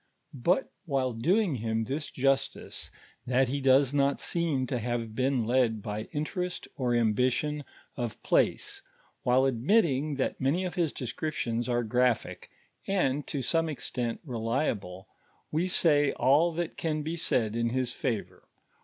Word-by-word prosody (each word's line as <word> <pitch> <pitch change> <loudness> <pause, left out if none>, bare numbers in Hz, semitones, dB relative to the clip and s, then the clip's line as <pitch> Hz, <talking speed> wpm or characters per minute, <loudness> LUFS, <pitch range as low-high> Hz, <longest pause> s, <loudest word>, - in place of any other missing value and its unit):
But 170 - +1 0.2
wliile 130 -4 0
doing 185 - +3
him 110 0 -1
this 140 +6 -3
justice, 135 +1 -1 0.4
that 130 +1 +3
lie 140 +2 -1
does 135 0 +4
not 140 0 +2
seem 160 -6 0
to 125 0 -2
have 115 -1 -3
been 130 0 +1
led 115 -3 +2
by 105 +1 -4
interest 180 +4 -3
or 125 -3 0
ambition 125 +6 +1 0.3
of 120 -3 -4
place, - - +1 0.4
while 125 +2 +3
admitting 145 - +2
that 135 - -2
many 155 +8 +1
of 180 - -3
his 170 -4 0
descriptions 120 -2 -3
ore 120 0 +1
graphic, 125 +1 0 0.4
and 150 -8 +1
to 140 -3 -3
some 165 +5 +1
extent 125 -5 -3
relie.ble, 115 - -2 0.4
we 165 +4 +1
say 145 -5 +3
all 145 +7 +4
that 170 0 -3
enn 155 -2 0
be 160 +2 -3
said 115 -9 0
in 115 0 +1
his 125 0 -1
favor. 120 -7 -4
130 Hz, 145 wpm, -29 LUFS, 120-150 Hz, 0.4 s, does